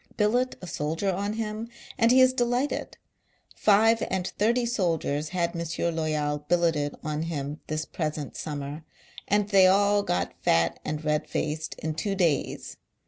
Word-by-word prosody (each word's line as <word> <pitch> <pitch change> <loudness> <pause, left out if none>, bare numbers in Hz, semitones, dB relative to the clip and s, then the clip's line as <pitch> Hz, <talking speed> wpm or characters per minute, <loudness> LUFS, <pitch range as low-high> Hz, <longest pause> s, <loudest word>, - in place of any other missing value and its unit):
Billet 245 +4 +2
a - - -4
soldier 165 +4 -1
on 200 +3 -2
him, 220 +1 -4 0.3
and 230 -2 +3
he 255 +2 +6
is 255 0 +6
delighted. 245 +2 -1 0.6
Five 220 +2 +4
aud 185 -1 -2
thirty 235 +4 +2
soldiers 165 -9 -1
had 170 -2 0
M. 170 - -2 0.3
Loval 150 -2 -1
billeted 165 -4 +1
on 150 0 -2
him 150 -2 -4
this 155 0 -2
present 155 -3 -4
summer, 145 +1 -5 0.4
and 205 0 +2
they 195 -2 +6
all 205 +2 +4
got 175 -3 -1
fat 85 0 +2
and 155 0 -4
red 150 0 0
faced 155 +1 -3
in 160 0 -3
two 195 +6 -2
days. 170 -7 -1
175 Hz, 150 wpm, -27 LUFS, 155-210 Hz, 0.6 s, he